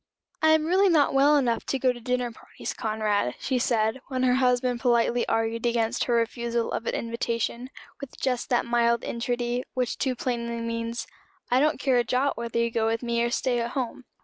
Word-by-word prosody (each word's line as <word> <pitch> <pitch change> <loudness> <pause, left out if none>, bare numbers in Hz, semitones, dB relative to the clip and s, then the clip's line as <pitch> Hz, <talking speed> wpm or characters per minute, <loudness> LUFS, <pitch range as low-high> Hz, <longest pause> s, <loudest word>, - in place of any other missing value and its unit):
"I 315 - +5
am 315 -1 +2
really 380 +4 +4
not 310 -5 +3
well 285 +2 +5
enough 240 -5 +1
to 270 - 0
go 255 -1 +2
to 240 - -10
dinner 250 0 -1
parties, - - -8
Conrad," 215 - -1
she 260 -2 -1
said, 230 +1 +1
when 255 -1 -2
her 250 -1 +4
husband 250 -1 +2
politely 235 0 +2
argued 225 +1 0
against 230 -1 0
her 240 - +1
refusal 235 0 -1
of 230 - -3
an - - 0
invitation, 235 +1 -2 0.3
with 275 -2 -10
just 250 -2 -1
that 245 - +2
mild 235 0 +2
entreaty 240 0 -2
which 250 -2 -1
too 260 -2 0
plainly 235 -2 -3
means, 230 +1 -3 0.5
"I 250 - +4
don't 300 0 +2
care 265 -3 +2
a 240 - +3
jot 260 +3 0
whether 235 0 -4
you 235 0 +1
go 225 -1 +1
with 225 +2 -1
me 235 -1 0
or 235 - +1
stay 245 0 0
at 235 +1 -3
home." 260 -1 -4
240 Hz, 200 wpm, -26 LUFS, 235-255 Hz, 0.5 s, I